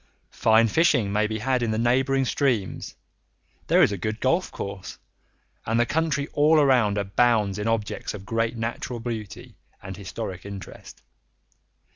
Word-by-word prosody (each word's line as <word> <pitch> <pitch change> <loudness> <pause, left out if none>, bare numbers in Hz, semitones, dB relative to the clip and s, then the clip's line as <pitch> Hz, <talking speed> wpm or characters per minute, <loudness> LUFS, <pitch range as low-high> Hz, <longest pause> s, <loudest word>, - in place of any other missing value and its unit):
Fine 110 +1 +4
fishing 120 -9 +2
may 105 +1 +2
be 110 0 -3
had 125 +3 0
in 120 - 0
the 110 - -1
neighbouring 130 +3 +2
streams, 120 - -1 0.7
there - - +5
is - - +3
a 100 - -4
good 110 +4 -3
golf 170 +8 +1
course, 100 -1 -7 0.7
and 115 +1 0
the 120 - +4
country 150 -1 -1
all 155 +2 +4
around 125 -8 +3
abounds 105 0 +1
in 105 - -2
objects 110 -2 -2
of 100 -1 -10
great 115 +3 -1
natural 115 +1 -4
beauty 115 -4 -7 0.2
and 95 0 -8
historic 95 -1 -6
interest. 100 -1 -10
115 Hz, 150 wpm, -25 LUFS, 105-130 Hz, 0.7 s, there